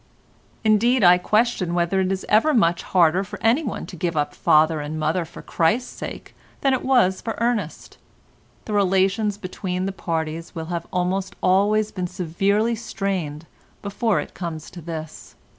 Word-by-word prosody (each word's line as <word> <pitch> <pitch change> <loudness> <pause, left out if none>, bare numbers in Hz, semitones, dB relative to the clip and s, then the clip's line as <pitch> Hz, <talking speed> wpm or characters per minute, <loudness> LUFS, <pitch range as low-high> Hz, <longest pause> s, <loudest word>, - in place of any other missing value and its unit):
Indeed, 225 +3 +3
I 180 0 +7
question 210 -4 +1
whether 175 +2 +1
it 190 0 +1
is 190 0 -3
ever 245 +8 +4
much 170 -6 +3
harder 180 +1 +3
for 190 - -8
anyone 240 +2 +1
to - - -10
give 170 -1 -2
up 145 - 0
father 155 +1 +3
and 150 +2 -5
mother 160 +3 0
for 160 - -12
Christ's 200 +10 0
sake - - -8 0.3
than 270 -1 +3
it 260 - -1
was 245 -8 +3
for 225 - -4
Ernest. 230 -9 -2 0.7
The 215 - -4
relations 195 +1 +2
between 185 -1 -4
the 195 - -1
parties 165 -2 -4
will 160 -1 -4
have 170 0 -4
almost 190 +2 -1
always 205 +3 +3
been 185 -2 -3
severely 195 +6 0
strained 190 -9 -3 0.4
before 205 +2 0
it - - -6
comes 165 -4 -6
to 175 - -10
this. 160 -1 -8
185 Hz, 160 wpm, -23 LUFS, 170-215 Hz, 0.7 s, I